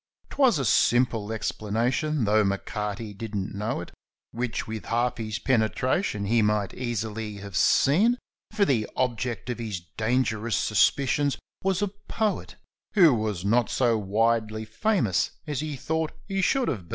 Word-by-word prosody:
'Twas 265 - +4
a 135 - -1
simple 115 -2 +2
explanation, 115 +7 -1
though 105 +1 +4
M'Carty 105 +2 -3
didn't 100 -2 -4
know 105 -1 -2
it, 90 - -9 0.4
Which 120 -1 -3
with 110 -1 -6
half 120 +1 0
his 110 -2 -3
penetration 110 - 0
he 115 +3 +3
might 105 -2 +1
easily 110 -3 -3
have 100 -2 -9
seen, 200 - +4 0.3
For 210 -2 +2
the 115 - +1
object 125 -2 -1
of 120 - -5
his 110 -5 -3 0.2
dangerous 115 -1 0
suspicions 140 +5 +2 0.3
was 190 +1 +1
a - - +2
poet, 210 +2 -3 0.4
Who 170 -8 +7
was 105 -5 -2
not 115 +3 +3
so 120 -3 +2
widely 110 +1 0
famous 110 - +1 0.2
as 150 -4 -3
he 155 -1 -3
thought 160 +4 -2
he 195 -1 -1
should 260 +6 +2
have 100 -9 -2
been. - - -21
115 Hz, 150 wpm, -26 LUFS, 105-140 Hz, 0.4 s, Who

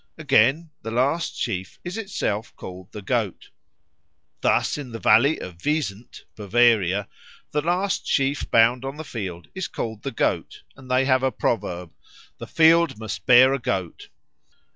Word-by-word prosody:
Again, 155 +1 +2
the 115 - -6
last 135 +8 0
sheaf 95 -5 -4
is 175 +2 -5
itself 155 - -3
called 90 0 -10
the 105 - -9
Goat. 110 -3 -2 0.9
Thus, - - +2
in 135 -5 -7
the - - -4
valley 120 +8 +4
of 90 -1 -9
the - - -1
Wiesent, 120 -8 -3
Bavaria, 105 -2 +2 0.4
the 150 - 0
last 180 +5 -1
sheaf 140 +1 0
bound 115 +2 +4
on 135 +2 -5
the 155 - -6
field 95 - -7
is 190 -2 -4
called 110 -2 -5
the - - -3
Goat, - - -2
and 130 -1 -15
they 130 +1 +2
have 130 -1 +3
a 130 0 +1
proverb, 90 -7 -2 0.5
"The - - -7
field 165 -3 +4
must 100 -5 -6
bear 125 +2 +7
a 135 - -1
goat." 95 -7 -3
120 Hz, 160 wpm, -23 LUFS, 105-145 Hz, 0.9 s, bear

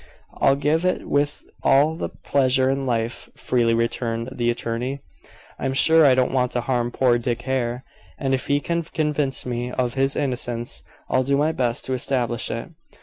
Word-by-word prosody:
"I'll 135 - +4
give 150 +4 +1
it 185 0 0
with 145 +1 0 0.2
all 145 +4 +4
the 160 - -4
pleasure 130 -1 +1
in 135 0 -2
life," 115 -1 -2
freely 115 -2 +1
returned 115 0 -1
the 120 -2 -1
attorney. 120 +3 -3 0.6
"I'm 135 0 -1
sure 160 +3 +6
I 130 - +5
don't 130 -1 +2
want 125 -2 0
to 120 - 0
harm 120 -1 0
poor 120 -1 +2
Dick 120 0 -2
Hare, 125 -1 -1 0.3
and 135 -2 -1
if 130 - -1
he 145 0 +2
can 170 +2 -1
convince 150 -4 -1
me 120 0 -3
of 125 -2 -1
his 135 +1 +1
innocence, 120 -3 -2 0.3
I'll 130 - +2
do 140 +2 +1
my 150 +2 +2
best 120 -6 -1
to 130 - -2
establish 125 -2 -1
it." 115 +7 -5
130 Hz, 180 wpm, -23 LUFS, 120-140 Hz, 0.6 s, sure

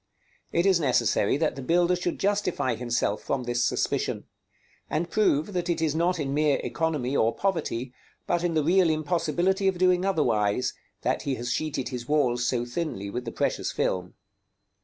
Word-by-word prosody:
It 170 - +1
is 190 -3 +4
necessary 125 -5 +2
that 155 0 0
the 135 - -6
builder 175 +6 +2
should 175 -1 -3
justify 195 -10 0
himself 120 -3 -1
from 135 -2 -2
this 120 0 0
suspicion; - - -1 0.7
and 165 +3 -2
prove 200 -3 +2
that 180 -1 -2
it 170 -1 0
is 160 -2 +1
not 170 +2 +1
in 140 -2 -2
mere 150 -1 +2
economy 150 -5 -1
or 115 -2 +2
poverty, 145 -10 -2 0.3
but 175 0 0
in 170 -2 0
the 155 - +2
real 175 +2 +4
impossibility 170 +5 +1
of 190 -2 +1
doing 180 0 +3
otherwise, 125 - +1 0.3
that - - 0
he 135 - -2
has 120 0 -4
sheeted 150 -3 -2
his 125 -2 -6
walls 125 -5 +2
so 120 -1 0
thinly 120 - -4
with 125 +3 -4
the 115 - -4
precious - - -1
film. 90 -1 -2
150 Hz, 175 wpm, -26 LUFS, 125-175 Hz, 0.7 s, is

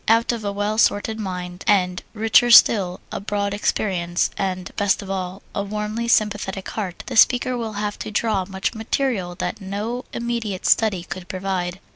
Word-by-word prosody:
Out 230 +2 +4
of 230 -2 -4
a 200 - -1
well 205 +2 -1
stored 220 +1 +2
mind, 180 -3 -5
and 180 -3 +2
richer 225 +2 +4
still 195 -6 +6
a - - -3
broad 200 0 -2
experience, 180 -4 0
and 185 -2 -3
best 205 -1 +1
of 195 - -6
all 185 0 -4
a - - -1
warmly 210 +3 -3
sympathetic 205 -4 0
heart, 190 -5 -5
the 255 - -5
speaker 250 +2 +4
will 225 -3 -4
have 205 0 -3
to - - -5
draw 215 -2 0
much 190 0 -3
material 220 -5 -1
that 195 - -4
no 210 +6 -4
immediate 235 -5 -3
study 205 -6 +3
could 180 0 -7
provide. 185 -1 -3
205 Hz, 170 wpm, -22 LUFS, 185-220 Hz, -, still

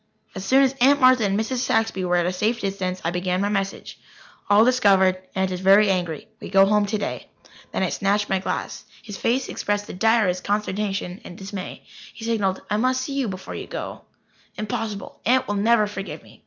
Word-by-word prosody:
As 190 - -6
soon 265 +7 +4
as 265 -1 +2
Aunt 280 +3 +5
Martha 255 -3 +5
and 200 0 +1
Mrs. 240 +4 -2
Saxby 225 -5 0
were 180 0 +1
at 175 -1 +2
a 180 - -1
safe 215 +6 0
distance, 190 -2 -3
I 170 - +1
began 180 +1 -1
my 200 +1 0
message: 195 -1 -3 0.5
"All 205 +2 +6
discovered. 195 -7 +3
Aunt 190 0 0
is 180 - -3
very 195 +2 +5
angry. 175 -5 -2
We - - -8
go 195 0 +6
home 210 0 +2
today." 210 0 -3 0.4
Then - - -1
I - - +1
snatched 205 +1 0
my 190 - 0
glass. 190 - -4 0.2
His 205 -3 -8
face 250 +6 0
expressed 205 0 -2
the - - -8
direst 205 -3 +2
consternation 200 -2 -2
and 175 - -10
dismay. 195 -1 -7 0.3
He 225 - -8
signalled: 205 -5 0
"I 210 - 0
must 255 +3 +1
see 275 +2 -4
you 275 -3 -1
before 190 -1 -6
you - - -6
go." - - -6 0.6
"Impossible. 215 -1 -5
Aunt 255 +3 +2
will 205 - -1
never 215 +2 +3
forgive 200 -1 -7
me. - - -18
205 Hz, 200 wpm, -23 LUFS, 190-225 Hz, 0.6 s, All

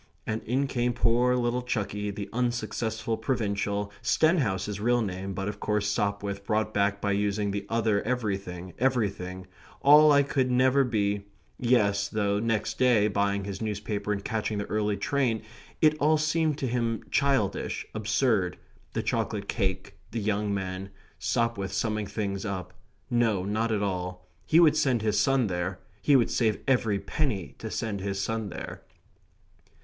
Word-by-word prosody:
And 110 0 -2
in 130 +4 +1
came 125 -2 0
poor 120 +2 +3
little 120 0 0
Chucky, 105 -4 -2
the 100 0 -5
unsuccessful 115 -2 -1
provincial, 105 -4 -1
Stenhouse 130 - +2
his 105 -1 -4
real 120 +2 +2
name, 95 -1 -4
but 95 0 -3
of 105 0 -4
course 105 -1 0
Sopwith 100 -1 -1
brought 110 +1 0
back 100 0 +1
by 100 - 0
using 100 0 0
the 100 0 -4
other 110 -3 +2
everything, 100 -7 -3
everything, 100 -7 -1 0.4
"all 150 +2 +8
I 140 -1 +6
could 135 -2 0
never 130 +2 +4
be" 100 -4 -1 0.3
yes, 100 -5 +2
though 100 -2 0
next 115 -1 -1
day, 120 -5 +4
buying 100 0 0
his 100 +1 -5
newspaper 105 -1 -2
and 100 -1 -2
catching 110 -1 -1
the 100 - -2
early 105 -1 0
train, 125 -6 0 0.4
it 155 -1 +6
all 155 +2 +4
seemed 155 -1 +1
to 135 - -2
him 115 -2 -1
childish, 135 -8 +1
absurd; 110 -3 +1 0.4
the - - -1
chocolate 100 -2 -1
cake, 95 -5 -2
the 115 - -3
young 105 0 0
men; 95 -1 -3 0.3
Sopwith 115 -5 0
summing 110 +1 -1
things 100 -2 -3
up; 100 -3 -4 0.4
no, 115 -6 +2
not 110 +3 0
all; 90 -3 -2 0.2
he 160 - +5
would 155 -3 +6
send 130 -7 +2
his 105 -1 +2
son 135 +2 +3
there. 90 -1 -2 0.2
He 145 - +4
would 120 -3 +3
save 110 -3 +2
every 120 -6 +2
penny 100 - -2
to - - -5
send 105 -3 -3
his 100 0 -2
son 110 0 -2
there. - - -7
105 Hz, 155 wpm, -28 LUFS, 100-120 Hz, 0.4 s, all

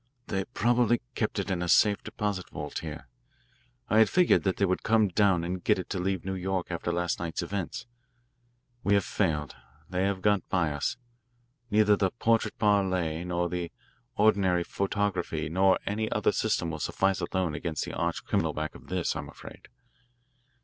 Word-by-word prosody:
They 95 -1 -1
probably 120 +1 +2
kept 110 -3 -2
it 100 0 -2
in 90 -2 -1
a 90 - -2
safe 100 +5 +4
deposit 100 -3 -3
vault - - -5
here. 80 -1 -7 0.8
I 110 +1 +4
had 110 - +6
figured 180 -1 +4
that 95 - +1
they 100 - +3
would 95 -1 0
come 110 -2 +3
down 95 -2 +3
and 90 +1 -4
get - - +3
it 95 - -4
and 90 -2 -2
leave 95 -2 -1
New 95 - -2
York 95 -1 -2
after 85 0 -2
last 85 0 -1
night's 85 -1 -3
events. 95 +4 -4 1.0
We 100 - +3
have 100 - +2
failed 75 -8 -1 0.3
they 90 +2 0
have 95 -2 -1
got 105 -2 +2
by 85 -5 +1
us. 75 +10 -2 0.7
Neither 105 -1 +4
the 95 -1 +1
'portrait 115 0 0
parle' 95 -6 +1
nor 90 0 0
the 85 -1 -4 0.4
ordinary 95 -4 +3
photography 95 -6 -2
nor 95 +3 +4
any 110 +2 -2
other - - +2
system 85 -2 0
will 80 - -5
suffice 95 +6 0
alone 90 -2 -1
against 80 -1 -3
the - - -7
arch - - -2
criminal - - 0
back 80 +1 -3
of - - -14
this, 90 -2 -1
I'm - - -5
afraid. - - -12
95 Hz, 175 wpm, -28 LUFS, 85-100 Hz, 1.0 s, had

